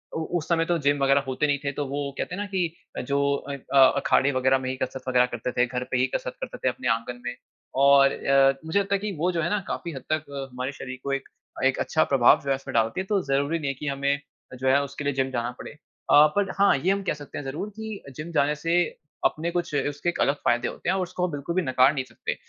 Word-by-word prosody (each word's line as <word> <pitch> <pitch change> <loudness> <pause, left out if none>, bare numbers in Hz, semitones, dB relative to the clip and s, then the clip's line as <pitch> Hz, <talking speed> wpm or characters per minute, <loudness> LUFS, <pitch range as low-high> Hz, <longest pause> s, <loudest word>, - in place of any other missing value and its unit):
ओ 160 - -1
उस 160 - -5
समय 165 -1 +2
तो 175 0 +1
जिम 145 -2 +2
वग़ैरह 135 +1 +4
होते 130 +3 0
नहीं 145 - +2
थे 140 - -1
तो 145 - -3
वो 140 +2 -3 0.2
कहते 180 - -3
हैं 205 - -4
ना - - -2
कि 180 -4 -1 0.3
जो 140 +2 -1 0.3
अन 140 - -3 0.2
अ, - - +4 0.2
अखाड़े 140 +1 +3
वग़ैरह 130 0 +3
में - - -1
ही 130 - -2
कसरत 130 0 -3
वग़ैरह 125 -1 +4
करते 120 +2 -3
थे, 125 - +2
घर 125 0 -3
पे 125 - +2
ही 130 - +3
कसरत - - -3
करते - - -5
थे - - +4
अपने - - -4
आंगन 120 +2 -7
में, 125 0 -3 0.4
और 140 0 +6
अ, 135 0 +3
मुझे 160 +5 +1
लगता 200 0 0
है 195 - -1
कि 205 -1 -4
वो 180 +3 +2
जो - - +1
है 170 - 0
ना 210 - +1
काफ़ी 170 - -4
हद 130 - -7
तक 155 0 -1 0.3
हमारे 125 +2 -4
शऱीर 130 -2 -8
को 140 - -1
एक 135 - -4 0.4
एक 135 - +3
अच्छा 155 - +2
प्रभाव 130 -3 +5
जो 140 - -2
है 135 - +3
उसमें 135 - -8
डालती 115 +6 +1
है 190 - -6
तो 200 -1 +1
ज़रूरी 140 +4 0
नहीं 145 - -3
है 140 - -1
कि 150 +3 -7
हमे, 140 0 +1 0.4
जो 130 +1 -2
है 140 +2 +5
उसके 140 +1 -6
लिए 145 - 0
जिम 130 0 0
जाना 120 -1 -2
पड़े। - - -8
अ, 150 0 +3
पर 200 -1 +1
हाँ 200 0 +5
ये 180 +8 +1
हम 200 - 0
कह - - 0
सकते 145 -1 -9
हैं 145 - -5
ज़रूर 150 +10 -4
कि 220 -2 -7
जिम 155 +4 -6
जाने 150 -1 +2
से 165 +3 -1 0.5
अपने 165 +2 +1
कुछ 175 -3 -2 0.2
उसके 145 +4 -2
अलग 140 - +3
फ़ायदे 120 0 +2
होते - - -4
हैं - - +2
और 190 - 0
उसको 180 0 -2
हम 180 - -3
बिल्कुल 145 +4 -4
भी 185 - +3
नकार 130 -1 +4
नहीं 135 -3 -2
सकते। - - -5
140 Hz, 270 wpm, -25 LUFS, 130-170 Hz, 0.5 s, और